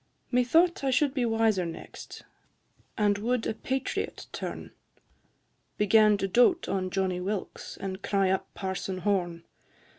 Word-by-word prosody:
IV. - - -25
Methought 320 +8 +3
I 270 - +1
should 265 +1 +2
be 255 -4 0
wiser 225 -4 +2
next, 165 -1 -8 0.7
And 205 -1 +2
would 240 +2 0
a - - -1
patriot 265 +4 -3
turn, - - -6 1.1
Began 210 0 +5
to 195 - -1
doat 245 - +3
on 185 -1 -1
Johnny 185 -1 -1
Wilkes 195 +1 -5
And 190 0 -5
cry 195 -2 +1
up 190 - -2
Parson 190 0 -3
Horne. 175 -4 -1
205 Hz, 140 wpm, -28 LUFS, 190-245 Hz, 1.1 s, Began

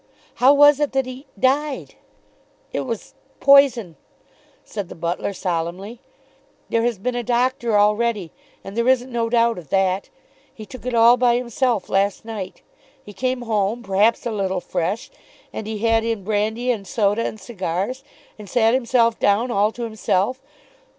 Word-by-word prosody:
How 260 +2 +7
was 290 0 +6
it 295 -2 0
that 270 -1 +1
he 255 +2 -9
died?" 275 +5 0 0.8
"It - - -1
was 230 -4 -5 0.3
poison," 260 - +4 0.7
said 200 -4 -6
the - - -9
butler 170 +4 -2
solemnly. 185 +4 -4 0.7
"There 230 - +1
has 235 -2 0
been 245 +7 -2
a 245 - -2
doctor 240 -2 +1
already, 210 -3 +1 0.3
and 195 - -9
there 235 +1 0
isn't 260 0 +2
no 230 -1 -1
doubt 230 -3 +2
of 155 -6 -14
that. 190 0 0 0.4
He 215 - -11
took 255 +2 -10
it 250 - -1
all 235 +2 +6
by 245 -1 +3
himself 240 -3 -1
last 195 +2 0
night. 210 -5 -7 0.4
He 210 - -12
came 255 +2 -2
home, 220 +1 -1
perhaps 205 +5 +2
a 235 - -1
little 190 -3 -1
fresh, 180 +5 -3 0.4
and 215 - -5
he 220 0 -4
had 225 +1 +2
in 225 -3 -2
brandy 220 +4 0
and 205 -5 -4
soda 210 +2 +1
and 220 - -4
cigars; 195 +4 -4 0.4
and 205 -2 -10
sat 230 -2 +3
himself 235 -2 +2
down 220 +5 +2
all 210 0 +2
to 240 - -7
himself. 220 +2 -1
230 Hz, 165 wpm, -21 LUFS, 200-245 Hz, 0.8 s, How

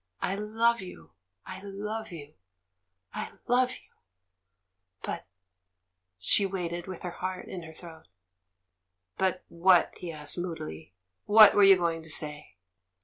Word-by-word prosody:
I 190 - -1
love 225 +3 +1
you, 80 - -11 0.3
I - - -8
love 205 +2 -5
you, 150 -3 -10 0.8
I - - -5
love 250 +1 +2
you! - - -15 1.1
But - - -5 0.3
— 90 0 -55
" 95 0 -55
She 95 - +2
waited 175 -3 -3
with 185 -2 -8
her 180 - -4
heart 185 +1 -5
in 180 - -6
her 160 -1 -11
throat. 165 -2 -13 1.1
"But 185 -1 0
what?" 175 +1 +3
he 175 - -5
asked, 150 +1 -3
moodily. 80 - -6 0.3
"What 215 0 +9
were 205 - +4
you 195 -1 +8
going 170 -2 -1
to 160 - -12
say?" 150 -4 -4
175 Hz, 145 wpm, -29 LUFS, 150-195 Hz, 1.1 s, What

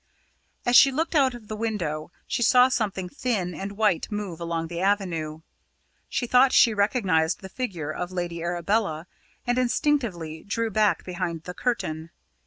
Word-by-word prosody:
As 245 - +3
she 275 - +8
looked 320 +6 -1
out 270 -5 +3
of 225 -3 -12
the 215 - -5
window, 175 -9 -3
she - - -2
saw 250 +2 +6
something 205 -7 -1
thin 190 -3 -2
and 195 +5 -5
white 210 -5 +1
move 205 -5 -4
along 165 -1 -2
the 170 +1 -5
avenue. 170 -6 -1 0.7
She 250 - -1
thought 255 +2 +5
she 230 - +5
recognised 195 -6 +1
the 190 - -8
figure 185 - -4
of 175 +3 -4
Lady 175 -2 -3
Arabella, 175 0 -1 0.4
and 245 +1 +1
instinctively 235 - 0
drew 225 +2 -2
back 210 -4 +2
behind 175 -3 -4
the 180 - -7
curtain. 165 -9 -2
195 Hz, 160 wpm, -25 LUFS, 170-235 Hz, 0.7 s, she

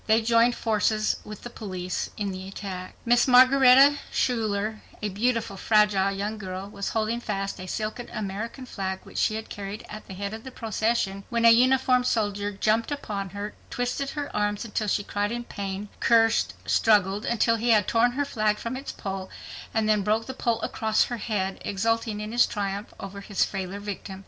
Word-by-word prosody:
They 220 +1 +4
joined 235 +1 +4
forces 215 -1 +1
with 210 -1 -10
the 240 - -7
police 185 -5 -4
in 205 -2 -2
the 190 0 -7
attack. 190 -2 -7
Miss 240 +2 +4
Margaretta 265 +2 +7
Schuyler, 215 -3 0 0.2
a 210 - -2
beautiful, 225 0 -1
fragile 210 -2 +3
young 205 +2 -3
girl, 190 0 -5
was 200 -1 -4
holding 225 +1 -1
fast 195 -4 -3
a 185 - -7
silken 215 +5 -4
American 215 +5 -5
flag 190 -5 -4
which - - -6
she 215 - +2
had 220 0 -5
carried 205 +2 -6
at 210 0 -9
the 190 - -8
head 200 +2 -4
of 220 0 -7
the 260 - -7
procession 220 -4 -1
when 235 0 +1
a 230 - +9
uniformed 250 +1 +4
soldier 205 -2 0
jumped 215 +5 +1
upon 205 -9 -4
her, 205 +2 -6 0.2
twisted 245 +3 -2
her 290 -1 -4
arms 205 +1 0
until 215 -1 -2
she 205 - +1
cried 205 +1 -2
in 240 0 -3
pain, 200 -2 -5
cursed, 225 -1 +3
struggled 205 -1 +3
until 230 -1 +2
he 235 +2 -1
had 215 -4 +4
torn 240 +1 +3
her 285 +2 0
flag 215 -5 0
from 230 +4 -4
its 270 +2 -5
pole, 190 -1 -5 0.4
and 220 -1 +1
then 215 -1 +3
broke 215 +3 +1
the 260 - -5
pole 235 -3 0
across 220 -1 +1
her 240 - -4
head, 195 -4 -2
exulting 225 +1 -1
in 210 +1 -5
his 240 +1 +4
triumph 200 0 -3
over 200 +1 -7
his 200 0 +1
frailer 195 0 -5
victim. 200 -1 -6
215 Hz, 190 wpm, -26 LUFS, 200-235 Hz, 0.4 s, a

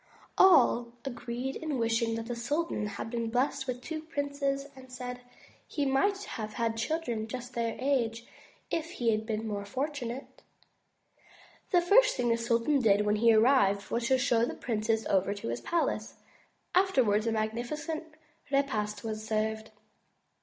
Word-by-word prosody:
All 245 -10 +5
agreed 250 +1 -4
in 310 -4 -3
wishing 230 0 +1
that 225 0 -4
the 240 0 -4
sultan 255 -1 -1
had 205 +2 -6
been 230 -1 -2
blessed 265 +3 0
with 250 0 -4
two 320 -1 -4
such 315 +1 -15
princes 280 -2 -1
and 260 -1 -13
said: 250 0 -6 0.5
"He 290 - -1
might 390 +10 +2
have 215 - -6
had 230 0 -1
children 235 -3 -2
just 250 +1 -6
their 230 -1 -1
age 240 -4 0 0.5
if 330 +1 -2
he 235 -7 +1
had 215 0 -1
been 220 0 -2
more 205 -1 -3
fortunate." 260 +2 -4 1.3
The 355 -3 +4
first - - +5
thing 240 - +1
the 230 - +3
sultan 235 +5 +2
did 210 -2 +4
when 210 0 +2
he 230 +2 +5
arrived 215 -4 +4
was 235 0 0
to 260 0 +4
show 240 -3 +2
the 240 - -1
princes 225 -1 -1
over 195 +1 +2
his 120 - -4
palace. 295 -10 -1 0.6
Afterwards 250 - +3
a - - +2
magnificent 245 +9 -3 0.4
repast 255 -7 0
was 215 -1 -4
served. 220 0 -1
240 Hz, 155 wpm, -30 LUFS, 220-275 Hz, 1.3 s, All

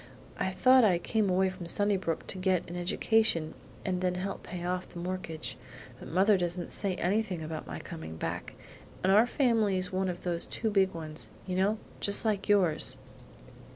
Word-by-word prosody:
I - - +1
thought 255 +8 +5
I 190 -5 +5
came 210 +3 0
away 190 +1 +3
from 185 -2 -8
Sunnybrook 195 -3 0
to 190 - -3
get 185 -2 +1
an 175 - -7
education 175 -2 +1 0.3
and 185 -2 -1
then 180 -1 +1
help 190 +2 -4
pay 175 -1 -6
off 180 0 -2
the - - -11
mortgage; 175 -3 -4 0.4
but - - -9
mother 190 +3 +4
doesn't 175 0 -2
say 195 -3 +1
anything 190 -2 0
about 155 0 -5
my - - -5
coming 80 0 -8
back, - - -4 0.5
and 190 - +4
our 220 +4 +6
family's 215 -8 +1
one 190 0 0
of 175 -1 -5
those 170 -1 +1
too 220 -2 -2
big 190 -2 +2
ones, 155 -1 -6 0.2
you 185 - -3
know, 200 +4 +2 0.2
just 200 +2 +2
like 210 -3 0
yours." 185 -7 +3
185 Hz, 180 wpm, -30 LUFS, 175-205 Hz, 0.5 s, our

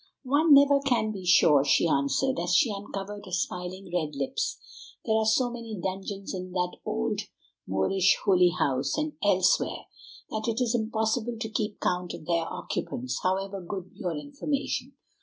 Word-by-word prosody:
"One 290 +3 +5
never 280 0 +6
can 245 -6 +1
be 190 -4 -7
sure," 150 -5 +6
she 145 +4 +3
answered 140 - +1
as 175 +1 +1
she 215 +3 +4
uncovered 200 0 -6
her - - -10
smiling 180 +1 -3
red 155 -4 -1
lips; 140 -1 -2 0.5
"there 220 - +2
are 220 0 +2
so 245 +3 +3
many 230 -4 -6
dungeons 195 +2 -4
in 185 -1 -6
that 180 -1 -1
old 60 - -1 0.5
Moorish 175 - +2
Holy 180 -3 +5
House, 140 - 0
and 305 0 -1
elsewhere, 190 -3 +2 0.5
that 215 +1 -3
it 230 +1 0
is 245 -2 +1
impossible 225 +1 -1
to 220 - -3
keep 215 -1 -3
count 180 0 -1
of - - -11
their 170 -1 0
occupants, 125 0 -4
however 195 +1 -1
good 185 +1 -6
your 175 -4 -3
information. 280 - -3
195 Hz, 160 wpm, -27 LUFS, 175-225 Hz, 0.5 s, never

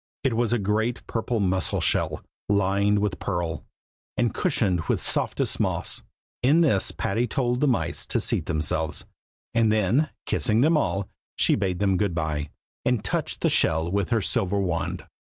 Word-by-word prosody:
It 135 -3 +2
was 120 0 +1
a 120 - +3
great 110 +4 -1
purple 115 0 -2
mussel 95 -2 +1
shell, - - 0 0.3
lined 100 +1 +2
with 100 -3 -1
pearl, 85 -4 -2 0.5
and 120 -3 +1
cushioned 110 - +1
with - - +1
softest - - 0
moss. - - -1 0.4
In 145 +7 +4
this 120 - +3
Patty 115 +5 -1
told 125 0 0
the 150 - +4
mice 125 - 0
to - - 0
seat - - 0
themselves, 80 0 0 0.5
and 115 -2 +3
then, 110 +8 +2 0.2
kissing 110 0 +1
them 160 +4 +4
all, 100 -10 0 0.3
she - - +3
bade 95 -3 0
them 95 -1 +2
good 100 -3 0
bye, 75 -3 -2 0.3
and 120 -4 0
touched - - -2
the - - +3
shell 80 +2 +2
with 100 0 0
her 115 -3 +2
silver 95 +1 +1
wand. 90 -4 -2
100 Hz, 165 wpm, -25 LUFS, 95-120 Hz, 0.5 s, In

